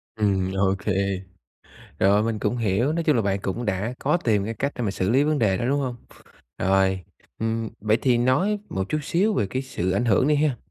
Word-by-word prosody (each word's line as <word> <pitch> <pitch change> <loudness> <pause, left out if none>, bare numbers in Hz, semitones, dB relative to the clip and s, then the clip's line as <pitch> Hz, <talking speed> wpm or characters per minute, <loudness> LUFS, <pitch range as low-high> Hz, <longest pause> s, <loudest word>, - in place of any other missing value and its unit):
Ừm, 95 -3 +1
OK. 95 +1 0 1.1
Rồi, 100 +2 +4
mình 110 -1 -1
cũng 120 - -1
hiểu, 115 +5 +1
nói 165 +1 -1
chung 150 -4 +3
là 115 - +2
bạn 100 -1 0
cũng 100 +6 -3
đã 105 +3 -2
có 150 +4 +1
tìm 110 - +1
cái 115 +2 -4
cách 140 +5 -2
để 125 - -3
mà 105 - 0
xử 95 -1 -1
lý 130 +4 +4
vấn 155 0 +1
đề 105 -6 +2
đó, - - -2
đúng 140 +3 +1
hông? 130 -3 -3 0.6
Rồi, 95 0 +2 0.4
ừm, 115 0 -1
vậy 110 +1 +2
thì 125 -3 +3
nói 155 - +2
một 95 0 -3
chút 155 - 0
xíu 195 +8 +1
về 105 - +1
cái 130 +7 -3
sự 95 -9 -3
ảnh 100 +6 +1
hưởng 120 +4 +3
đi 150 - +4
ha. 145 -3 +1
115 Hz, 225 wpm, -24 LUFS, 100-135 Hz, 1.1 s, Rồi